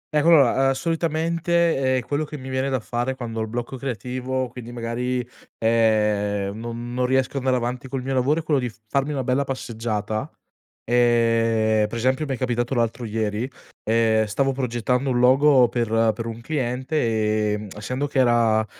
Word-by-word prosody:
ecco 150 +2 +3
allora 135 -3 +5
solitamente, 165 -3 +1
ehm, 130 - +1
quello 145 +5 -1
che 150 0 -7
mi 130 -1 -8
viene 130 +1 -1
da 130 -1 0
fare, 120 +3 -2
quando 115 -3 -5
ho - - 0
il 110 - -2
blocco 120 +3 -5
creativo, 130 0 -3
quindi 120 -1 -9
magari, 120 +1 -3 0.3
ehm, 105 -3 +1
non 120 +1 -6
non 125 0 0
riesco 130 +1 +1
a - - 0
andare 130 -1 +1
avanti 125 +1 -3
col 130 0 -4
mio 135 +1 -2
lavoro, 135 +5 +2
è - - -5
quello 150 -3 +1
di 125 -2 -2
f 110 - -18
farmi 140 +6 0
una 135 - -2
bella 130 +3 +1
passeggiata, 110 -5 -3 0.5
ehm, 115 -2 +3
per 105 - -7
esempio 130 +6 +1
mi 135 - -2
è - - -3
capitato 120 0 -1
l'altro 120 -1 -1
ieri, 110 +2 -2 0.4
ehm, 110 -1 +2
stavo 135 +6 0
progettando 125 0 -1
un 120 - +1
logo 130 0 +5
per 120 -2 -1 0.3
per 115 +1 -5
un 115 0 -6
cliente, 120 -6 0
ehm, 105 0 -4
essendo 125 +7 -3
che 140 - -5
era, 115 -3 +3
125 Hz, 180 wpm, -23 LUFS, 115-135 Hz, 0.5 s, allora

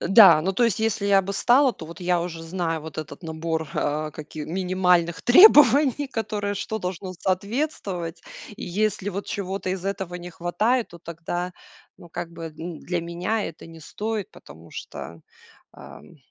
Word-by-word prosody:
Э, - - -2
да, 195 -6 +9
ну 190 +2 0
то 240 +5 +2
есть 220 -2 +1
если 220 -2 0
я 195 -1 +5
бы 200 +2 -4
стала, 250 +6 +4
то 160 - -10
вот 170 - -11
я 180 -1 +1
уже 165 -2 -6
знаю 165 -1 -2
вот 160 0 -8
этот 150 +2 -7
набор, 160 -1 -3
а, 150 +1 -1
каки 155 0 -8
минимальных 180 -1 +1
требований, 285 - +7
которые, 210 -4 -2
что 220 +2 -3
должно 185 0 -5
соответствовать. 190 - -2 0.3
И 245 - -6
если 205 +2 -1
вот 200 +2 -5
чего-то 195 -1 -3
из 185 -1 -4
этого 190 -2 -3
не 175 0 -8
хватает, 210 +9 0
то 170 - -13
тогда, 170 +2 -5 0.5
ну, 175 - -13
как 170 0 -6
бы, 165 -1 -7
м, 165 -1 -6
для 175 -1 -2
меня 175 +6 -2
это 165 - -8
не 165 0 -12
стоит, 210 +6 -4
потому 80 +3 -15
что, 85 0 -8 0.5
ам, 70 +2 -13
180 Hz, 175 wpm, -24 LUFS, 165-205 Hz, 0.5 s, да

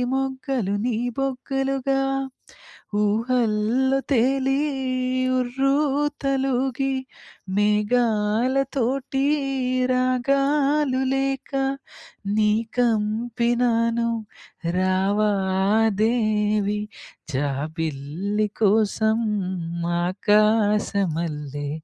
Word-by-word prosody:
మొగ్గలు 265 -6 -2
నీ 235 -3 0 0.2
బొగ్గలుగా 270 0 -1 1.0
ఊహల్లో 230 +3 +1
తేలి 270 +1 +2 0.8
ఉర్రుతలూగి 270 0 0 0.6
మేఘాలతోటి 240 +5 +1 0.7
రాగాలు 275 +2 +1
లేక 270 0 -2 0.8
నీ 210 -1 +3 0.3
కంపినాను 235 +1 +1 0.7
రావా 190 +3 +2 0.7
దేవి 210 -2 +1 0.5
జాబిల్లి 155 +7 -2
కోసం 220 +1 +2 0.9
ఆకాశమల్లె 190 - +1
235 Hz, 45 wpm, -23 LUFS, 210-270 Hz, 1.0 s, నీ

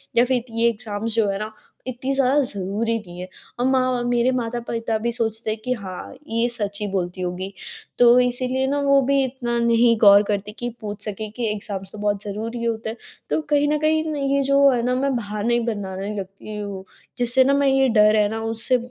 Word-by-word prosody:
या 240 - +5
फिर 250 -2 0
ये 230 +1 +1
एग्जाम्स 220 -1 -3
जो 225 -2 +3
है 195 0 -2
ना 215 +1 -3 0.4
इतनी 255 +2 -3
ज़्यादा 270 +1 +3
ज़रूरी 215 -1 -2
नहीं 175 -4 -11
है 180 - -6 0.3
और 245 - +1
माँ 255 -2 +1
मेरे 240 +1 +2
माता-पिता 230 -2 -2
भी 235 +2 -2
सोचते 225 -1 -2
हैं 215 - -4
कि 255 - +1
हाँ, 190 -6 -7
ये 230 +1 +1
सच 205 -4 -2
ही 210 - -1
बोलती 185 -1 -2
होगी। 180 +2 -4 0.5
तो 245 0 +7
इसीलिए 255 +1 0
ना 285 +1 0
वो 275 0 +4
भी 275 +1 +2
इतना 245 -2 -2
नहीं 235 0 +4
गौर 205 -1 +7
करती 205 0 -2
कि 240 - -2
पूछ 205 -1 -6
सकें 215 0 -5
कि 235 +1 -3
एग्जाम्स 200 -2 -5
तो - - -10
बहुत 205 -1 -1
ज़रूरी 225 +3 -5
होते 225 -1 -2
हैं। 225 - -6 0.3
तो - - +1
कहीं 290 -1 +3
ना 300 +1 +2
कहीं 310 +1 +2
ना 295 - -3
ये 275 0 +1
जो 275 +1 +5
है 245 -2 +1
ना 250 0 +1
मैं 270 +1 0
बहाने 215 0 -2
ही 240 - +3
बनाने 195 -1 -5
लगती 195 +2 -7
हूँ, 200 -2 -6 0.3
जिससे 245 +1 +3
ना 275 +2 +3
मैं 280 0 +3
ये 270 0 +4
डर 215 -1 +5
है 210 -1 +3
ना 225 - -3
उससे 225 +3 0
230 Hz, 215 wpm, -22 LUFS, 210-255 Hz, 0.5 s, तो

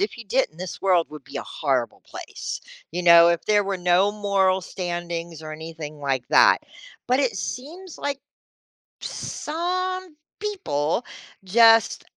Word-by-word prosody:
if 405 - -2
you 235 - -8
didn't, 200 -7 0
this 185 0 -7
world 180 -4 +3
would 150 -3 -10
be - - -9
a - - -4
horrible 130 -6 -2
place, - - -7 0.3
you 180 - -2
know, 170 -1 +8
if 170 -1 0
there 205 -1 +3
were 195 -1 -2
no 180 +3 +3
moral 195 -2 +1
standings 175 -2 -5
or 155 - -7
anything 155 -1 -8
like 135 -3 -2
that. - - +6 0.5
But 255 +2 +3
it 260 -4 0
seems 335 +8 -6
like 285 -1 -3 0.8
some 365 +2 -3 0.3
people 195 - -1 0.4
just 225 +3 +5
185 Hz, 145 wpm, -24 LUFS, 165-255 Hz, 0.8 s, know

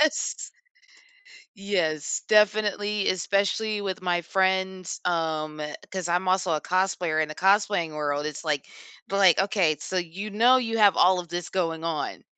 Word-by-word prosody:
Yes. 310 +1 0 1.1
Yes, 175 -7 -1
definitely, 210 -1 +2
especially 200 +3 0
with 190 -2 -4
my 175 -1 0
friends, 190 0 -1
um, 155 -3 -2 0.3
'cause 185 -2 -4
I'm 175 +2 0
also 185 -1 +1
a 150 - -2
cosplayer. 180 -4 0
In 155 - -4
a - - -6
cosplaying 195 -3 +2
world, 145 -1 -2
it's, 155 -1 -5
like, 150 -4 -2 0.4
"But 195 - -2
like, 190 -4 +5
okay, 190 -6 +2
so, 185 +5 -3
you 180 +5 -5
know, 235 +5 +5
you 225 -3 -1
have 205 -2 +5
all 180 0 +4
of 175 - -11
this 175 +1 -5
going 165 -3 -2
on, 165 -3 -4
185 Hz, 155 wpm, -25 LUFS, 165-200 Hz, 1.1 s, like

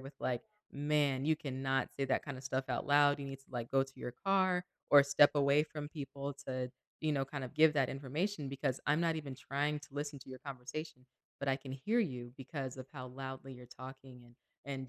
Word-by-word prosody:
with 135 +1 -9
like, 125 -2 -1 0.3
man, 145 -2 +2
you 155 0 +4
cannot 135 -2 -1
say 135 - 0
that - - +1
kind 140 -3 -5
of 130 - -9
stuff 130 0 -1
out - - 0
loud. 145 0 +5
You 140 - -4
need 135 0 -6
to 135 - -21
like 120 -2 -4
go 135 0 +4
to 135 - -15
your 125 -1 -5
car 185 -2 +3 0.3
or 145 -1 +10
step 145 +1 +7
away 140 +1 +5
from 150 -1 -5
people 140 -2 -5
to, 130 -1 -2 0.3
you 155 -1 +1
know, 135 -1 +1
kind 135 -1 -5
of 130 - -8
give 155 0 +6
that 135 -3 +3
information 145 +4 -2
because 135 -1 -1
I'm 155 - +4
not 165 -1 +3
even 140 -4 -5
trying 145 +2 0
to - - -13
listen 145 0 -3
to - - -13
your 130 -1 -8
conversation, 130 +1 -6 0.3
but 140 - -2
I 135 - +4
can 135 -1 -9
hear 210 - +1
you 125 - -3
because 135 -1 -5
of 130 - -7
how 130 -3 -6
loudly 130 +1 -6
you're 125 -1 -11
talking 130 -1 -10
and 120 0 -18 0.3
and 135 -2 -4
135 Hz, 225 wpm, -35 LUFS, 130-145 Hz, 0.3 s, or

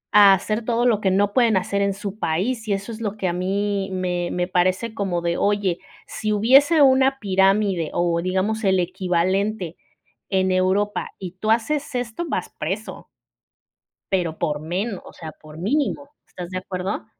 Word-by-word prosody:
a 200 -2 +9
hacer 215 +4 -3
todo 235 +1 0
lo 225 -4 +3
que 195 - +2
no 200 +2 +2
pueden 235 -5 +4
hacer 200 +2 -1
en 200 -1 +1
su 205 0 -6
país. 220 +9 -1
Y 205 - +1
eso 200 +3 -4
es 225 0 -8
lo 210 -1 -3
que 195 - -1
a 175 - 0
mí 195 +2 -1
me 180 -2 -2
me 180 0 -1
parece 185 +5 0
como 190 -5 -2
de: 170 0 0
"Oye, 200 -4 +1 0.3
si 215 0 -3
hubiese 275 +9 +5
una 265 0 +4
pirámide 195 - +2
o, 170 -1 +1
digamos, 190 +5 -1
el 190 -2 +3
equivalente 185 +1 -1 0.5
en 190 -1 +1
Europa, 190 +3 0
y 185 -3 -6
tú 215 - -2
haces 265 +5 0
esto, 245 +6 -3
vas - - -2
preso". - - -5 1.0
Pero 175 -5 0
por 150 -1 -1
menos, 185 +6 -3
o - - -12
sea, 160 -2 -8
por 155 0 -14
mínimo, 280 - -1 0.2
¿estás 180 -1 -8
de 185 - -3
acuerdo? 185 +2 -4
195 Hz, 175 wpm, -22 LUFS, 180-220 Hz, 1.0 s, a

